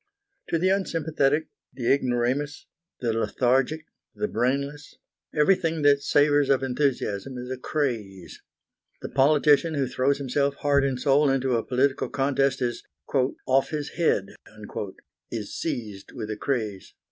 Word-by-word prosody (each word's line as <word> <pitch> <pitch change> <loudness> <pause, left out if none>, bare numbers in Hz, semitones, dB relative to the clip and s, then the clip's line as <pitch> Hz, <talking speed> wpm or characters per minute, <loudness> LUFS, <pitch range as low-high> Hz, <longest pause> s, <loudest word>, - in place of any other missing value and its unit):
To 165 - +1
the 185 +3 +2
unsympathetic, 160 -6 +1 0.2
the 125 -1 +1
ignoramus, 130 +2 -1 0.4
the 115 -2 0
lethargic, 130 +6 +1 0.3
the 210 - -1
brainless, 140 - -2 0.4
everything 165 0 +2
that 140 -1 +5
savours 145 0 +3
of 135 -1 +3
enthusiasm 130 -3 -1
is 125 +1 -6
a 130 - -3
craze. 115 - -3 0.6
The - - -4
politician 150 +3 +4
who 140 -2 +1
throws 130 +2 +1
himself 140 +1 0
heart 140 -1 +2
and 135 -2 -1
soul 140 +2 +3
into 135 -2 +1
a 115 - 0
political 130 +2 0
contest 135 -1 +1
is 120 -1 -2 0.6
"off 135 +1 +2
his 150 -2 -3
head," 125 - +1 1.0
is - - -5
seized 105 -5 -5
with 110 -4 -5
a - - -2
craze. 105 -5 -3
135 Hz, 135 wpm, -25 LUFS, 125-145 Hz, 1.0 s, that